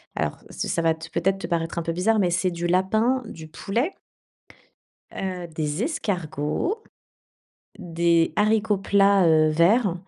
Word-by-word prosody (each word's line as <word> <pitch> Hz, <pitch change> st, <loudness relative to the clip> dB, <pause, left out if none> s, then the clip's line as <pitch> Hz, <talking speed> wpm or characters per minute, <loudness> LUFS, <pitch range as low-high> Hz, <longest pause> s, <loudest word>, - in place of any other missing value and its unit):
alors, -, -, -2 dB
ça -, -, -4 dB
ça 165 Hz, -, 0 dB
va 165 Hz, -1 st, +3 dB
te 160 Hz, 0 st, -10 dB
peut-être, 195 Hz, +4 st, 0 dB
te -, -, -5 dB
paraître 165 Hz, 0 st, -2 dB
un -, -, +1 dB
peu 165 Hz, -, -2 dB
bizarre, 205 Hz, +6 st, +1 dB
mais 180 Hz, -3 st, +2 dB
c'est 175 Hz, +2 st, +1 dB
du 175 Hz, 0 st, -5 dB
lapin, 220 Hz, +8 st, +2 dB
du 160 Hz, -8 st, -10 dB
poulet 235 Hz, -, -2 dB, 1.2 s
heu, 185 Hz, -2 st, -4 dB
des 155 Hz, +3 st, -3 dB
escargots, 200 Hz, -, -2 dB, 1.0 s
des 170 Hz, -1 st, +1 dB
haricots 215 Hz, -1 st, +2 dB
plats, 200 Hz, -1 st, +3 dB
heu, 155 Hz, -1 st, +4 dB
verts 180 Hz, +5 st, +3 dB
180 Hz, 150 wpm, -24 LUFS, 165-210 Hz, 1.2 s, heu